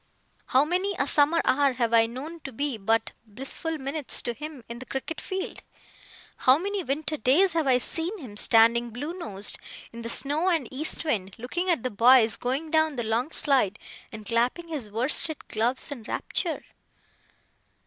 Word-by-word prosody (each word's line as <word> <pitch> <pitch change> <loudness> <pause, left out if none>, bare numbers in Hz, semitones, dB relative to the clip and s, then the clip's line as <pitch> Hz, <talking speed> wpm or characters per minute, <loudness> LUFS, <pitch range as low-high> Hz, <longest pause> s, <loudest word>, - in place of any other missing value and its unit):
How 265 +3 +3
many 370 +4 -1
a - - +1
summer 300 +3 +3
hour 280 0 +3
have 235 -2 -1
I 225 -1 +5
known 285 +8 -8
to 275 - -8
be 280 +2 -1
but 225 +2 0
blissful 270 +8 -4
minutes 280 +1 0
to 240 - -2
him 300 -1 -9
in 235 0 -8
the 260 - -9
cricket 275 +4 -5
field! 380 0 -5 0.8
How 255 +2 +5
many 400 +4 -3
winter 310 +2 -2
days 320 - +4
have 325 -3 0
I 255 -2 +5
seen 330 - -3
him, 250 - -10
standing 230 +2 +4
blue 285 +9 -6
nosed, 210 - -2 0.3
in 235 - -8
the 230 - -5
snow 295 +9 +1
and 320 -9 0
east 295 +5 -2
wind, 200 -10 -2
looking 345 +11 -3
at 335 -10 +1
the 255 - -2
boys 230 0 +5
going 275 +6 -3
down 315 -2 +2
the 240 - -3
long 225 +5 -1
slide, 260 - +2 0.3
and 215 -1 -9
clapping 245 - 0
his 280 -10 -5
worsted 260 +8 +3
gloves 240 +6 -1
in 270 -5 -6
rapture! 320 - -3
270 Hz, 175 wpm, -26 LUFS, 235-315 Hz, 0.8 s, I